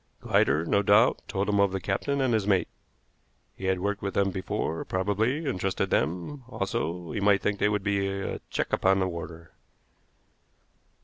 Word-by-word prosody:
Glider, 80 +2 +2
no 100 +4 +2
doubt, 105 +5 +4
told 100 -1 -2
him 100 -1 +2
of 100 -1 +4
the 95 - -2
captain 135 +10 -1
and 130 -3 +2
his 105 -3 +1
mate. 95 -3 +2 0.9
He 95 - -7
had 95 -1 +1
worked 100 +1 -1
with 100 -1 -4
them 100 -1 +2
before, 90 -3 -3
probably, 105 - 0
and 125 -9 -2
trusted 95 0 -1
them; 90 - -1
also, 90 -6 -3
he - - -2
might 100 -1 +3
think 100 -1 0
they 105 - +3
would 105 -2 -1
be 100 -1 0
a 95 0 -3
check - - -2
upon 95 0 +3
the 95 -1 +1
warder. 85 -2 -7
100 Hz, 180 wpm, -27 LUFS, 95-105 Hz, 0.9 s, doubt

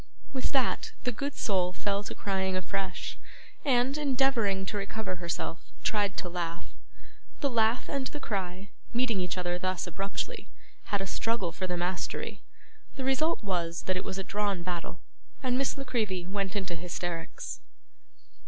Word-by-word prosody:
With 260 - 0
that, 265 -3 +2
the 250 - +2
good 280 +5 -2
soul 180 -3 +2
fell 200 +1 +1
to - - -4
crying 190 -1 +1
afresh, 190 0 -2 0.4
and, 260 -1 +4
endeavouring 255 -9 +3
to 205 - -2
recover 200 -1 -2
herself, 170 0 -3
tried 205 -2 +2
to 185 - 0
laugh. 170 -1 -3 0.7
The 280 - +3
laugh 230 +1 +4
and 275 -2 0
the 295 - -5
cry, 190 -4 -2 0.2
meeting 235 -6 +3
each 180 +1 -1
other 175 0 +1
thus 185 0 0
abruptly, 195 +3 -2 0.4
had 205 -1 +1
a - - 0
struggle 210 -2 +1
for 185 +2 -2
the 180 -1 0
mastery; 180 +1 -1 0.5
the 270 - -3
result 270 +2 +3
was, 170 -4 0
that 185 - +1
it 185 - 0
was 190 -1 -3
a 195 - -1
drawn 200 -3 0
battle, 175 -1 -3 0.4
and 250 -1 +3
Miss 270 +2 +2
La 275 - -2
Creevy 215 -9 0
went 195 +1 -1
into 190 -3 0
hysterics. 170 0 -3
195 Hz, 160 wpm, -31 LUFS, 180-235 Hz, 0.7 s, and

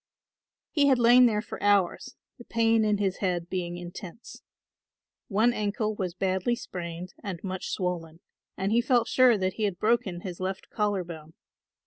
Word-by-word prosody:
He 290 -3 +3
had 265 -2 +5
lain 245 +1 +7
there 210 -2 0
for - - -8
hours, 205 +5 +1 0.2
the - - -10
pain 225 -1 +2
in 210 -1 +2
his 195 -2 -1
head 175 -3 -2
being 175 -2 -3
intense. 175 +4 -9 0.9
One 220 +4 +2
ankle 215 0 -1
was 185 -4 -4
badly 190 +5 0
sprained 175 -5 -7
and 190 -4 -5
much 190 -1 -4
swollen 170 -3 -3 0.4
and 195 +2 -1
he 235 +2 +4
felt 245 -2 +2
sure 255 -3 +5
that 190 -1 -1
he 220 - -4
had 195 -4 -2
broken 215 -4 0
his 180 -2 -7
left 190 +1 -4
collar 205 -3 0
bone. 160 -2 -10
200 Hz, 165 wpm, -27 LUFS, 180-230 Hz, 0.9 s, lain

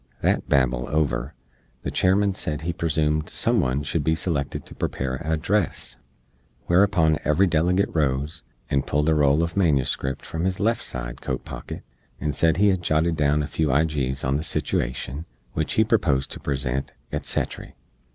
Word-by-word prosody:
That - - +1
Babel 65 -2 +2
over, 70 -4 0 0.5
the - - -2
Chairman 100 +2 +3
sed 75 -5 -3
he 85 +2 -2
presoomed 75 -2 0
some - - +1
one 65 +3 0
shood 70 +3 -1
be 80 +2 +2
selected 75 -4 -2
to - - -10
prepare 65 -1 -2
a 80 +5 -2
address; 90 +4 -1 0.7
whereupon 85 -4 +3
every 75 +6 +3
delegate 90 +3 +2
rose, 70 -1 0 0.3
and 70 -1 0
pulled 75 +2 +1
a - - +4
roll 75 -2 +4
uv 85 +1 0
manuscript 70 -6 +1
from 80 +2 -3
his 95 0 -1
left 115 +3 +1
side - - -6
coat - - -3
pocket, - - -7 0.4
and 75 -1 -1
sed 80 +4 +2
he 105 +2 +5
had 95 -2 +1
jotted 80 0 +1
down 75 0 +2
a - - -1
few 80 +2 0
ijees 70 -2 0
on 70 +2 +2
the - - -2
situashn, 70 -1 -2 0.3
wich 80 - -1
he 110 - +4
proposed 85 - +1
to - - -5
present, 70 -2 -2 0.2
et - - -2
settry. - - -3
75 Hz, 170 wpm, -24 LUFS, 70-85 Hz, 0.7 s, he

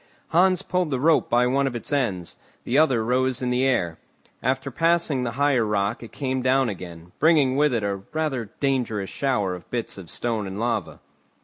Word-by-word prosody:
Hans 185 +2 +3
pulled 180 -3 0
the 130 -3 -1
rope 155 +3 +3
by 120 +1 +3
one 135 +2 +2
of 125 - -4
its 120 - -5
ends, 100 -11 -1 0.3
the 125 - -2
other 135 -7 +3
rose 130 +1 +1
in 125 - 0
the 125 +1 +1
air; 105 -12 0 0.4
after 130 +2 -1
passing 165 -2 +2
the 120 -2 -2
higher 140 -2 +2
rock 105 0 -1
it 115 - -10
came 130 -2 -2
down 130 0 +2
again, 90 -3 -8
bringing 150 -5 +4
with 150 +1 +3
it 115 -4 0
a 100 -1 -1
rather 140 -9 -2
dangerous 120 -8 -1
shower 125 -9 0
of 90 - -10
bits 115 -4 -3
of 90 - -11
stone 115 -4 -2
and 95 +2 -6
lava. 120 +1 -2
125 Hz, 195 wpm, -24 LUFS, 110-140 Hz, 0.4 s, bringing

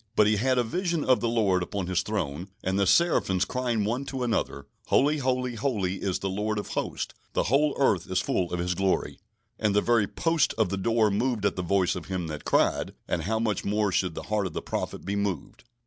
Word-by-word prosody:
But 105 - +5
he 105 0 +3
had 130 +4 +2
a 125 - +3
vision 170 +5 -1
of 130 -1 +4
the 115 - 0
Lord 100 -6 +2
upon 95 +1 -3
His 90 -1 +1
Throne, 90 -5 -3 0.2
and 95 +1 0
the 100 - +2
seraphims 100 - +3
crying 120 -2 -1
one 120 +6 -1
to 130 -2 -3
another: 110 - -1 0.2
"Holy, 150 +3 +3
holy, 125 -1 0
holy 105 -7 -1
is 95 -3 0
the 95 - -3
Lord 105 +3 -1
of 105 - -4
Hosts: - - -3 0.2
the - - +1
whole 140 +7 +2
earth 95 - +2
is 95 0 +1
full 90 -2 -1
of 90 - -1
His 90 +1 0
glory." 95 +1 0 0.4
And 105 -2 +1
the - - +6
very 115 -3 +3
"posts 165 - +1
of 110 -5 +1
the 100 - -1
door 110 +1 +2
moved 110 0 0
at - - +1
the 90 - -2
voice 90 +1 +1
of 90 - -6
him 95 -2 -2
that 75 -1 -6
cried"; - - +1
and 80 -2 -1
how 110 +3 0
much 110 -3 -1
more 105 0 +1
should 90 -2 0
the - - -5
heart 105 -2 0
of 85 - -9
the - - -3
prophet - - -4
be 100 - -2
moved! 100 -2 -3
105 Hz, 230 wpm, -27 LUFS, 95-120 Hz, 0.4 s, the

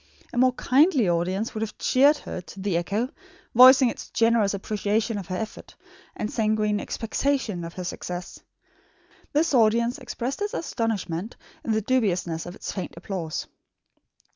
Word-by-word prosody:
A - - -5
more 255 0 +5
kindly 270 - +3
audience 185 +5 0
would 215 - -4
have 220 - -4
cheered 285 +4 +4
her 185 - -6
to 185 +2 -12
the 190 -2 -1
echo, 205 +8 -1 0.4
voicing 255 +2 +8
its - - -9
generous 225 -3 +2
appreciation 210 +2 -1
of 190 - -8
her 185 - -3
effort, 220 +1 -7 0.4
and 215 - -3
sanguine 215 -1 +1
expectation 225 -5 -2
of 165 0 -8
her 185 - -5
success. 180 0 -6 0.9
This 305 +1 +1
audience 235 +2 +3
expressed 255 +3 -4
its 415 0 -2
astonishment, 220 - -3 0.3
in 230 - -2
the 220 - +1
dubiousness 180 -10 0
of 175 - -8
its - - -5
faint 190 - -5
applause. 170 -3 -4
215 Hz, 150 wpm, -25 LUFS, 185-250 Hz, 0.9 s, voicing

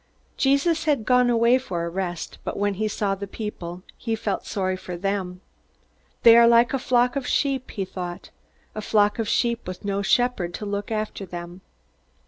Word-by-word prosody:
Jesus 300 +4 +2
had 285 -8 +1
gone 250 0 +4
away 235 +2 +4
for 175 -10 -4
a - - -3
rest, 175 -1 -4
but - - -4
when 205 0 +1
he 215 +3 -1
saw 205 -1 -1
the 200 +1 -5
people 185 -4 -6
he 225 -2 -2
felt 210 -3 -3
sorry 185 -2 -1
for 180 -1 -7
them. 190 -1 -3 0.8
They 230 -1 +9
are 235 0 +7
like 235 +3 +5
a 270 - +1
flock 245 0 +2
of 275 -2 -2
sheep, 270 -2 0
he 195 -3 -3
thought 180 -1 -7 0.4
_a 215 - -3
flock 210 0 +2
of 225 - -1
sheep 235 -4 0
with 185 +2 -7
no 200 0 -1
shepherd 200 -5 +1
to 210 - -6
look 200 0 -3
after 215 -2 -3
them. 175 0 -8
210 Hz, 185 wpm, -24 LUFS, 185-240 Hz, 0.8 s, They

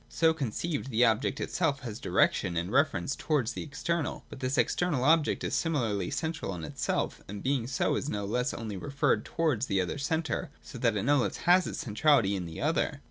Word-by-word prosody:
So 160 -1 +3
conceived, 145 +1 -3
the 120 0 +4
object 115 +4 +1
itself 160 -6 0
has 115 -3 -6
direc - - +3
tion 85 - -3
and 85 +3 -2
reference 140 - +1
towards 145 -8 0
the - - -5
external. 160 +2 -3
But - - -9
this 130 +2 -1
external 165 -8 +1
object 155 +2 +3
is - - -2
similarly 115 - 0
central 160 - -3
in 85 - -7
itself, 75 - -2
and 100 +1 -7
being 130 -3 0
so, 130 - 0
is 145 - -2
no 105 -5 -2
less 125 +5 0
only 110 -4 -5
referred 140 +9 0
towards 150 -8 0
the 95 - +1
other 90 +9 -2
centre; 160 +2 -1
so 125 - -9
that 115 -3 +2
it 100 - -1
no 145 +3 +4
less 125 - 0
has 180 +1 +5
its - - -4
centrality 115 -2 +3
in 90 -3 -4
the 80 - -8
other. - - 0
130 Hz, 205 wpm, -29 LUFS, 105-155 Hz, -, has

